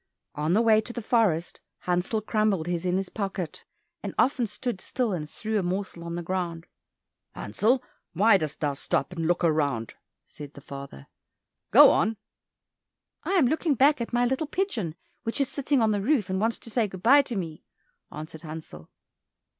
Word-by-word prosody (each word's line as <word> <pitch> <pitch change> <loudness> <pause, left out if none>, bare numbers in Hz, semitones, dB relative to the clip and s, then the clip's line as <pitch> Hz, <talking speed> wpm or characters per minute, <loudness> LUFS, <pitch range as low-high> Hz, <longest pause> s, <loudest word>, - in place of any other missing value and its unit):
On 150 +3 0
the 220 +4 +4
way 220 -2 +5
into 220 +2 -2
the 240 - -5
forest 205 -8 +1 0.2
Hansel 180 +5 0
crumbled 215 -6 +1
his 175 0 -2
in 180 0 +1
his 195 -1 -3
pocket, 195 -5 -4 0.4
and - - -6
often 255 -3 +2
stood 210 -1 -4
still 245 -5 -1
and 150 -4 -4
threw 220 +4 -2
a - - 0
morsel 185 -1 -3
on 170 0 -5
the 175 - -4
ground. 170 -2 -3 0.7
"Hansel, 230 - +1 0.3
why 200 +4 +5
dost 155 -2 -5
thou 145 -2 +1
stop 140 - -1
and 165 -2 -2
look 175 +1 +1
round?" 145 -8 +1 0.3
said 145 -1 -11
the - - -9
father, 140 - -9 0.6
"go - - +9
on." 220 0 +1 1.1
"I - - -1
am 355 -8 +5
looking 310 +2 +1
back 280 +2 +4
at 235 - -4
my 245 0 +2
little 265 +5 -1
pigeon 245 - -2 0.3
which 225 - -3
is 275 - +1
sitting 280 -3 +1
on 220 - +3
the 205 -1 0
roof, 215 -5 +1
and 190 +1 0
wants 225 +1 +1
to 230 - -11
say 225 -1 +1
good 185 -2 -10
bye 280 +5 +7
to 260 -4 -5
me," 165 -5 -5 0.5
answered 155 +1 -8
Hansel. 155 - -9
195 Hz, 185 wpm, -27 LUFS, 165-235 Hz, 1.1 s, go